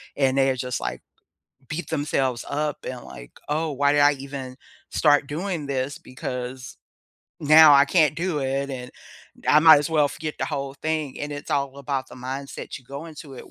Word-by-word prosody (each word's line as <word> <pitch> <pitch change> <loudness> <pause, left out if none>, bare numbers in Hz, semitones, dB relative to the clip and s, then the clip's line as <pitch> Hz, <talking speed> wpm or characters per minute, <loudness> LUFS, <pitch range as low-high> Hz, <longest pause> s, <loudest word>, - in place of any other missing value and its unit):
and 135 -1 +1
they 135 0 +4
are 130 - +1
just, 125 -1 -3
like - - -4 0.7
beat 155 0 -5
themselves 135 -5 -1
up 150 0 -1
and 125 -1 -6
like, - - -11 0.2
"Oh, 155 +1 0
why 140 +1 +2
did 145 0 +3
I 145 +1 +6
even 135 -2 -7 0.3
start 145 -2 +3
doing 165 +1 -3
this? 135 0 -2
Because 125 0 -7 0.6
now 155 0 +8
I 140 0 +7
can't 155 0 +3
do 170 -3 -1
it, 135 +1 -1
and, 125 -2 -6 0.5
eh, - - -5
I 150 - +8
might 160 -1 +8
as 150 - -3
well 150 -2 +4
forget 155 +1 -6
the - - -1
whole 140 -2 -4
thing." 155 -2 -3
And 145 0 -4
it's 145 0 -7
all 140 -1 -1
about 135 -2 -3
the - - -12
mindset 135 +3 -6
you 130 - -21
go 140 +5 -8
into 150 -3 -10
it - - -11
140 Hz, 195 wpm, -24 LUFS, 130-150 Hz, 0.7 s, now